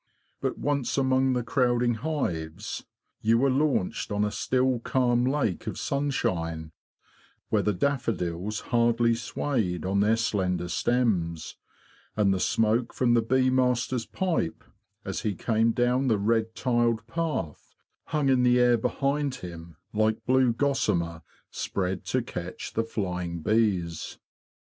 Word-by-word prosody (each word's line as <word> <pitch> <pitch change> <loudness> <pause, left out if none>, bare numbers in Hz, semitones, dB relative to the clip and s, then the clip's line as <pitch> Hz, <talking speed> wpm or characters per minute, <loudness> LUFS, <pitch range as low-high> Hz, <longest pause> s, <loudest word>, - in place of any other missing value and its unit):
But - - -1
once 140 -3 -1
among 130 -1 +3
the 125 -1 0
crowding 120 -1 +2
hives, 105 - -3 0.4
you 115 +1 +3
were 135 +2 +3
launched 135 -10 0
on 105 0 +1
a 105 - -2
still 125 +4 +1
calm 120 0 +1
lake 130 - -1
of - - -3
sunshine, 85 - -2 0.8
where - - +2
the 105 - +1
daffodils 105 -6 -1
hardly 115 -1 +3
swayed 115 - -2
on 95 +1 +1
their 105 +2 +4
slender 90 -6 -1
stems; 90 -6 0 0.6
and 100 -2 +3
the 95 - -1
smoke 115 +5 +1
from 120 -2 +2
the 120 - +4
bee 130 +3 +2
master's 125 -1 +1
pipe, 175 - -1 0.4
as 95 -4 -3
he 105 -3 -1
came 115 +5 +2
down 125 +3 +1
the 110 -4 +3
red 110 +2 0
tiled 120 -3 +1
path, 155 - -4 0.3
hung 150 -2 0
in 130 -2 +4
the 125 0 +4
air 120 -1 +5
behind 140 +3 0
hhim 85 -2 -8 0.2
like 110 +1 +1
blue 130 -1 +4
gossamer 115 - 0 0.3
spread 95 -1 -3
to - - 0
catch - - -6
the 115 - +1
flying 90 -6 -3
bees. 95 -6 0
115 Hz, 135 wpm, -27 LUFS, 95-130 Hz, 0.8 s, air